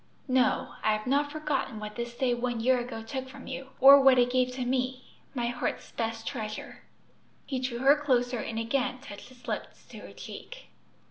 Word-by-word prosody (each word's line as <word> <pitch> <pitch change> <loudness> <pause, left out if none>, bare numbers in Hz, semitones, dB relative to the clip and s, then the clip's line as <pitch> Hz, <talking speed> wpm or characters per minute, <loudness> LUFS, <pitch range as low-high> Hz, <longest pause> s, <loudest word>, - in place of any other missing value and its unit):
"No; 255 -1 +2
I 215 0 +3
have 215 0 -3
not 285 +3 +1
forgotten 295 -6 -2
what 210 0 -7
this 235 0 -5
day 250 -1 +1
one 240 -1 -2
year 250 +2 +3
ago 240 -2 -5
took 260 +3 -5
from 275 0 -11
you, 265 0 -6
or 275 +1 +10
what 265 -1 +6
it 245 0 +4
gave 255 0 +2
to 255 -1 -2
me 255 0 -1 0.3
my 240 -2 0
heart's 240 0 -3
best 225 -1 -3
treasure." 215 -5 -5 0.7
He 265 -2 -2
drew 255 -2 -3
her 275 +2 +7
closer, 250 -5 +1
and 225 +1 -4
again 255 +2 0
touched 245 -3 -11
his 250 -1 -17
lips - - -5
to - - -10
her - - -11
cheek. - - -10
255 Hz, 195 wpm, -29 LUFS, 235-265 Hz, 0.7 s, or